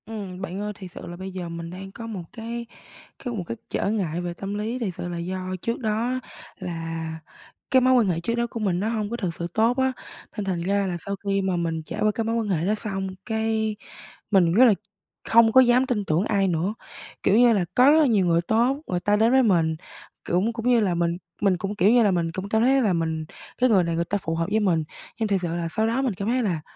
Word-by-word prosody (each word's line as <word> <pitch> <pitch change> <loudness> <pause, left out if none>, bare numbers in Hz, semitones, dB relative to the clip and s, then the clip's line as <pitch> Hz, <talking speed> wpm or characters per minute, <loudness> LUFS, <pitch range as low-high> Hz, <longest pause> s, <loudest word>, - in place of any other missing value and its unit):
Ừm, 200 -4 -7
bạn 190 0 -4
ơi, 210 0 -3
thiệt 185 -2 -10
sự - - -9
là 175 - -7
bây 190 +1 -6
giờ 180 -2 -5
mình 170 0 -6
đang 190 +2 -8
có 230 +3 -8
một 200 -6 -5
cái 235 0 -5 0.5
cái 245 -2 -5
một 200 -5 -3
cái 115 - -4
trở - - -1
ngại 180 -6 -1
về 175 -1 -4
tâm 195 +3 -5
lý. 220 +4 -3
Thiệt 210 -7 -2
sự - - -4
là 175 -1 -4
do 185 +2 -4 0.2
trước 230 - -2
đó 230 +3 -1 0.4
là 165 -3 -4 0.6
cái 260 - +6
mối 255 +1 +4
quan 240 -5 +4
hệ 170 -3 0
trước 230 +7 -2
đó 235 0 0
của 230 - -6
mình 190 -5 0
nó 210 +3 0
hông 215 -3 -2
có 235 - -3
thực 185 -7 -2
sự 170 +1 -4
tốt 230 +3 +2
á, 265 0 +2 0.5
nên 205 - -2
thành 180 -3 -1
ra 200 +2 +1
là 175 -2 -2
sau 200 - -2
khi 195 -1 +1
mà 190 -1 0
mình 165 -2 -2
trải - - -6
qua 215 - +3
cái 225 +2 -2
mối 225 +1 -1
quan 225 -3 -1
hệ 170 -3 0
đó 210 - +2
xong, 195 -3 -3 0.2
cái 220 -1 0 0.6
mình 180 -4 +4
rất 245 +7 +7
là 230 - +6 0.6
không 225 0 +6
có 260 - +8
dám 250 +1 +4
tin 225 -6 -1
tưởng 160 +2 +1
ai 200 -3 +2
nữa. 175 +3 0 0.5
Kiểu 195 - +4
như 240 -1 +6
là 195 -5 +1
có 255 +3 +7
rất 315 - +6
là 310 - +5
nhiều 210 -6 +3
người 170 -1 +3
tốt, 235 +9 +2
người 180 - -1
ta 205 +3 +2
đến 220 +3 +3
với 265 0 +5
mình 165 -7 +2 0.5
cũng 190 +7 +1
cũng 230 +1 -4
như 245 -1 +5
là 200 -5 +1
mình 170 0 0 0.2
mình 195 -3 +3
cũng, 195 +3 -4
kiểu 200 0 +4
như 240 -1 +5
là, 205 - +3
mình 170 -2 0
cũng 190 +4 -5
cảm 220 +1 +2
thấy 270 +2 +4
là 210 -6 +2
mình 160 -2 -1 0.3
cái 255 +1 +3
người 195 -5 +5
này 170 -1 -1
người 170 +1 0
ta 200 - -1
phù 165 -4 -3
hợp 165 0 -1
với 220 - +3
mình, 175 -6 +2 0.4
nhưng 220 - +1
thiệt 195 -2 +1
sự 170 -1 -2
là 170 -1 -2
sau 220 +7 0
đó 235 +4 0
mình 260 -5 0
cảm 195 +2 -4
thấy 250 +1 +1
là 175 -7 -1
200 Hz, 265 wpm, -24 LUFS, 175-225 Hz, 0.6 s, có